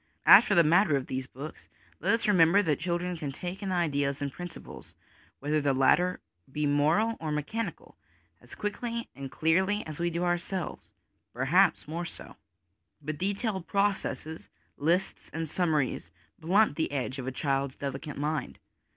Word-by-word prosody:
As 205 +4 +10
for - - +1
the 170 - +7
matter 170 0 +4
of 130 - -4
these 130 -1 -4
books, 140 +5 -10 0.3
let - - +1
us 230 -1 +1
remember 190 0 +5
that 155 -6 0
children 175 +1 -2
can 150 -4 -4
take 180 +7 -6
in 195 -2 -3
ideas 145 -6 0
and 140 -1 -3
principles, 175 +4 -10 0.4
whether 150 +2 0
the 140 -2 +1
latter 180 +7 +3 0.3
be 150 +1 -1
moral 155 +11 +2
or 155 -2 -3
mechanical, 150 +10 -4 0.5
as - - -12
quickly 230 +3 -4
and 135 -1 -7
clearly 190 +9 +1
as 155 0 -7
we 170 0 +1
do 170 +1 -2
ourselves 175 0 -2 0.4
(perhaps 150 +12 +3
more 170 +3 -4
so); - - -10 0.6
but 150 0 -5
detailed 195 -1 -2
pro 200 +2 +3
cesses, 160 -4 -7 0.3
lists 170 +6 -1
and 160 0 -3
summaries, 155 - 0 0.3
blunt 185 0 +3
the 160 - -1
edge 135 -1 -3
of 130 - -5
a - - -1
child's 135 0 -1
delicate 140 +2 -5
mind. 150 +2 -2
160 Hz, 160 wpm, -29 LUFS, 145-185 Hz, 0.6 s, As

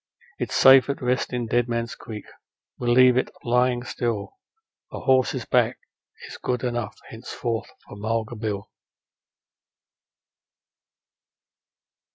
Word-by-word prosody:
It's - - -3
safe 135 0 +7
at 140 - -2
rest 125 0 0
in 125 -1 -2
Dead 120 +1 +1
Man's 115 -1 -2
Creek, 105 -2 -9 0.5
we'll 120 -1 0
leave 125 0 +6
it 130 - +1
lying 125 0 +2
still; 120 - -3 0.5
A - - -6
horse's 130 -2 +2
back - - +2 0.5
is - - -10
good 125 0 -2
enough 120 -3 -3
henceforth 115 0 -4 0.2
for - - -10
Mulga 110 +2 -2
Bill.' 105 -3 -4
120 Hz, 115 wpm, -24 LUFS, 115-125 Hz, 0.5 s, safe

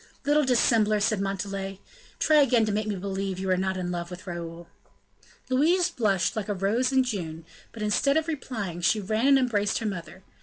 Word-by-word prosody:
"Little 295 +1 +3
dissembler!" 225 -4 +3
said 210 -1 +1
Montalais, 195 0 -4 0.4
"try 310 0 +3
again 250 -6 +4
to 215 - -1
make 215 +1 -1
me 210 - -1
believe 195 0 -3
you 190 0 -2
are - - +4
not 190 +1 -1
in 180 -1 -3
love 170 -1 -4
with 180 +1 -9
Raoul." 170 -1 -7 0.8
Louise 320 +8 +2
blushed 195 -7 0
like 215 -2 -3
a 205 - 0
rose 220 +7 +1
in 265 -1 +4
June, 165 -9 -5 0.3
but 225 -2 -7
instead 275 +7 +2
of 320 0 0
replying, 220 - -4
she 195 +5 +2
ran 215 +5 0
and 275 -1 +6
embraced 215 -6 +1
her 225 - -4
mother. 185 -2 -6
205 Hz, 195 wpm, -26 LUFS, 185-245 Hz, 0.8 s, and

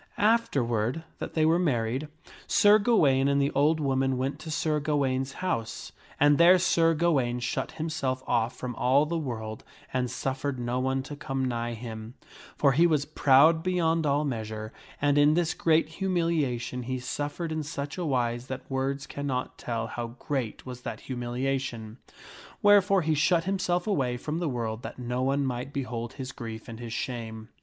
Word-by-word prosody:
Afterward 140 - +1 0.2
that - - -6
they 155 -1 +3
were 165 +2 +4
married, 130 -3 0 0.4
Sir 205 +1 +6
Gawaine 145 - +3
and 140 0 +2
the 140 +1 +1
old 150 +4 +3
woman 135 -2 +1
went 135 +2 -2
to 160 - -8
Sir 155 -1 0
Gawaine's 140 -2 0
house 115 -11 -3 0.3
and 145 +1 +5
there 175 +2 +8
Sir 165 -2 +3
Gawaine 140 -7 +1
shut 120 - -3
himself 155 -5 -2
off 115 +1 0
from 125 -1 -4
all 135 +4 +4
the 165 +3 -3
world 110 -6 -5 0.3
and 125 -1 0
suffered 130 +2 -3
no 120 +1 -2
one 130 +1 0
to 145 +2 -7
come 135 -2 -2
nigh 120 -1 -2
him; 110 0 -8 0.4
for 140 - +4
he 165 +6 +5
was 150 -3 +1
proud 155 +2 +5
be 185 +2 -1
yond 165 -2 +1
all 145 +2 +2
measure, 110 -4 -4 0.3
and 145 0 +3
in 145 +1 +5
this 175 -1 +1
great 160 -1 +2
humiliation 160 -9 -1
he 130 +1 -3
suffered 145 +6 -4
in 155 0 -1
such 145 -2 -5
a 180 - -3
wise 120 -4 -1
that 130 -1 -6
words 135 +1 -1
cannot 135 -3 -4
tell 115 -2 -2
how 115 +1 -6
great 130 -7 -3
was 125 -1 -8
that - - -6
humiliation. 125 -2 -3 0.6
Wherefore 200 -2 +5
he 160 0 +1
shut 155 +3 +3
himself 180 -2 0
away 130 -12 0
from 150 +6 -3
the 170 -3 -1
world 115 -3 -3
that - - -8
no 125 0 -3
one 135 +2 +1
might 125 +1 -3
behold 125 -5 -4
his 135 -1 -6
grief 115 -3 -8
and 115 -1 -8
his 120 -1 -7
shame. 115 -2 -5
135 Hz, 175 wpm, -28 LUFS, 125-155 Hz, 0.6 s, there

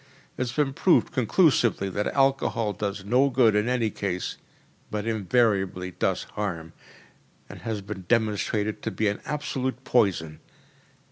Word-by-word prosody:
It - - -5
has 125 -1 -1
been 135 0 0
proved 175 +5 +3
conclusively 125 - +3
that 100 +2 -2
alcohol 135 -5 +1
does 100 0 -4
no 125 +6 +3
good 120 -4 +4
in 105 +3 +1
any 120 -4 +1
case, 95 -3 -3 0.5
but 105 0 -3
invariably 100 -4 +1
does - - -1
harm, 85 -6 -5 0.7
and - - -10
it - - -17
has 110 -3 -2
been 95 -2 -7
demonstrated 110 -1 0
to - - -2
be 110 - -1
an 100 - -4
absolute 130 -3 -3
poison. 95 -12 +1
110 Hz, 145 wpm, -26 LUFS, 100-125 Hz, 0.7 s, good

